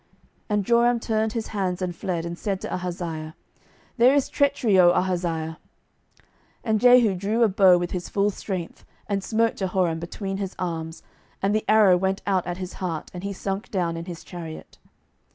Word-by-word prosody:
12:009:023 - - -40 0.4
And 210 -2 0
Joram 235 +1 +3
turned 220 -1 -1
his 225 -2 -3
hands, 190 -3 -2
and 180 -2 -3
fled, 170 -1 -3
and 170 0 -4
said 195 +1 -3
to - - -5
Ahaziah, 170 -3 -4 0.6
There 250 +4 +6
is 280 - +1
treachery, 245 -8 +2
O 175 -1 +7
Ahaziah. 170 -3 -1 0.6
12:009:024 - - -33 0.4
And 220 -2 +1
Jehu 245 -4 +6
drew 205 +6 0
a - - +6
bow 190 -2 +5
with 175 0 -3
his 180 -1 -4
full 205 +1 +1
strength, 185 -4 -6 0.2
and 200 -2 -1
smote 225 +2 +1
Jehoram 180 -4 0
between 195 +3 -5
his 195 -1 -4
arms, 165 -2 -4 0.4
and 195 +1 +1
the 215 0 0
arrow 210 -4 +6
went 190 +1 -1
out 190 -3 0
at 175 0 -3
his 185 -1 -6
heart, 165 -4 -4
and 180 0 -7
he 200 - -3
sunk 195 +1 -4
down 175 -4 -1
in 165 0 -6
his 175 -2 -8
chariot. 165 -3 -9
190 Hz, 190 wpm, -24 LUFS, 175-210 Hz, 0.6 s, O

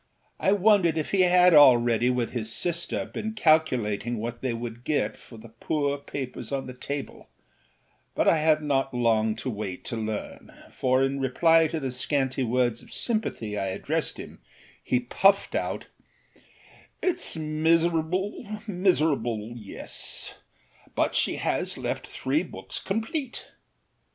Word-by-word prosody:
I 190 - +2
wondered 200 -5 +4
if 155 - -2
he 195 - +3
had 180 0 +6
already, 120 -5 +6
with 125 -2 -1
his 115 -3 -2
sister, 170 +4 0
been 220 0 -5
calculating 125 - +1
what 115 +2 -5
they 130 - -1
could 120 0 -6
get 150 +3 0
for 115 - -15
the 110 +1 -12
poor 140 +5 -2
papers 130 -4 -6
on 135 -1 -2
the 130 - -7
table; 140 +3 -6 0.9
but - - +1
I 160 - +5
had 155 0 +3
not 135 -3 0
long 110 -2 +2
to 125 +3 -4
wait 100 -4 -6
to - - -4
learn, 110 -1 -5 0.2
for 130 0 +1
in 135 +1 -1
reply 160 +5 +4
to 160 +1 -3
the 135 -3 -3
scanty 130 +1 -1
words 120 -1 +1
of - - -16
sympathy 215 - -2
I 100 -1 -2
addressed 95 - -2
him - - -10 0.4
he 125 - 0
puffed 195 +11 +3
out: - - -2 1.2
âItâs 355 - +2
miserable, 165 +7 0
miserable, 150 - 0
yes; 105 -5 -6 0.6
but - - +1
she - - +2
has - - -1
left - - -4
three 140 +4 -1
books 180 - -6
complete. 225 +6 -4
135 Hz, 140 wpm, -26 LUFS, 120-165 Hz, 1.2 s, had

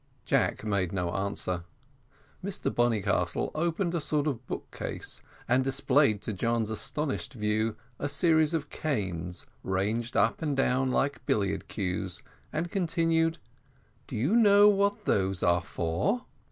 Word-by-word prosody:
Jack - - +1
made 100 -5 0
no 90 -3 -1
answer. 95 -3 -2 0.8
Mr - - -2
Bonnycastle 120 -4 +1
opened 170 +2 0
a 170 - 0
sort 150 0 0
of 130 -5 -3
book - - -5
case, - - -5 0.3
and 125 +2 +3
displayed 135 -4 +2
to 110 - -3
John's 115 +2 0
astonished 140 +7 -2
view 110 0 0 0.2
a 145 - -1
series 160 0 +3
of 150 -2 -3
canes, 90 - -3 0.2
ranged 105 +6 -1
up - - +2
and 150 -4 -1
down 130 0 +2
like 140 +1 0
billiard 100 -1 0
cues, 90 -2 -3 0.3
and 165 +2 -2
continued, 165 -2 +1 0.7
"Do - - -6
you 140 - +2
know 205 -3 +7
what 205 +1 +1
those 95 -1 +1
are 85 0 +4
for?" 90 - -1
125 Hz, 140 wpm, -29 LUFS, 100-160 Hz, 0.8 s, know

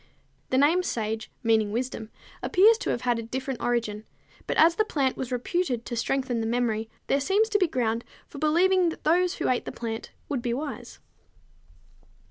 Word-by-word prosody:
The 260 - +1
name 305 +7 +4
sage, 220 -8 -3
meaning 220 -2 +2
wisdom, 230 -1 -3 0.3
appears 435 +5 +5
to - - -3
have 240 - -1
had 240 -2 +1
a - - -2
different 260 +2 -4
origin, 230 -3 -1 0.4
but - - -1
as 330 +1 +6
the 430 - +2
plant 275 -10 0
was 260 -1 -5
reputed 250 -1 -1
to 240 - -4
strengthen 250 0 -1
the 225 - -1
memory, 225 -2 0 0.2
there 275 - +1
seems 405 +8 +2
to 415 -1 +2
be 365 - +3
ground 235 -5 -1 0.2
for 285 - -10
believing 350 +4 +3
that 325 - -8
those 355 +3 +3
who - - -2
ate 255 - +1
the - - -4
plant 225 -1 -5 0.2
would 275 -5 -2
be 235 0 -1
wise. 255 -4 -6
255 Hz, 185 wpm, -26 LUFS, 230-330 Hz, 0.4 s, as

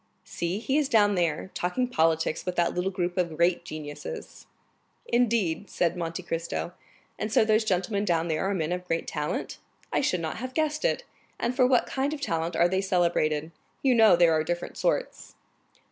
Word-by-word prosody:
"See, 170 +3 -3
he 265 +7 +1
is 290 -3 0
down 210 -5 +4
there, 175 -1 -1
talking 215 +9 -1
politics 160 -7 +1
with 180 -1 -3
that 175 - +1
little 180 +2 0
group 180 -1 -2
of 170 -3 -1
great 170 +1 +2
geniuses." 145 - -8 0.6
"Indeed?" 220 -7 +1
said 170 -1 0
Monte 170 +1 -4
Cristo; 170 +1 -3 0.5
"and 215 - -2
so 220 - +4
those 215 +1 +3
gentlemen 200 +1 0
down 170 -4 +1
there 160 +4 0
are 200 - 0
men 165 -2 -1
of 180 0 -3
great 165 -1 -1
talent. 150 -1 -3 0.3
I - - +2
should 180 -10 0
not 160 -1 -3
have 255 +2 -6
guessed 305 -1 0
it. - - +1 0.4
And 250 - -1
for 255 -1 +4
what 250 -2 +3
kind 275 +3 -1
of - - -9
talent 165 - -2
are 170 - +4
they 190 +2 0
celebrated? 170 -5 +1 0.3
You 265 -2 +4
know 220 -5 +7
there 170 -1 +5
are 155 0 +2
different 175 +2 -4
sorts." - - -2
180 Hz, 190 wpm, -27 LUFS, 165-220 Hz, 0.6 s, know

